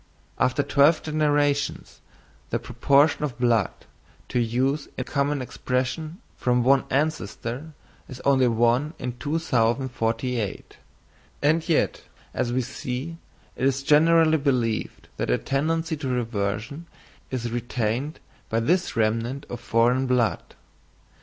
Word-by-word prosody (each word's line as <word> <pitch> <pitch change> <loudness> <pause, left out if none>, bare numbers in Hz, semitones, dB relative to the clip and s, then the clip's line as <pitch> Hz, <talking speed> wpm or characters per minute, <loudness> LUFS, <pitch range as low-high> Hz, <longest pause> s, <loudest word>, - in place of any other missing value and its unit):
After 130 +3 +2
twelve 150 +4 +4
generations, 145 -2 0 0.5
the - - 0
proportion 145 +2 +2
of 135 -5 -3
blood, 120 -5 +2 0.6
to 125 - 0
use 130 +5 0
a - - -1
common 140 -1 -1
expression, 130 +8 -3 0.2
from 125 -1 +1
one 135 +2 +4
ancestor, 145 0 -2 0.4
is 130 -2 -8
only 135 -2 +4
1 120 +7 +2
in 125 - -3
2048; 120 - -1 0.7
and 160 +3 +2
yet, 160 - +1 0.3
as 120 - -1
we 130 +1 0
see, 130 +5 -5 0.4
it - - -5
is 135 0 0
generally 160 +2 +5
believed 125 -6 -1
that - - -2
a - - +3
tendency 160 +4 -1
to 145 -2 -5
reversion 115 +4 -2 0.4
is 120 -3 -3
retained 120 +4 -2 0.3
by 115 - +1
this 175 +10 +1
remnant 115 +5 0
of 120 - -5
foreign 120 +3 +2
blood. 125 -3 0
130 Hz, 120 wpm, -25 LUFS, 120-150 Hz, 0.7 s, generally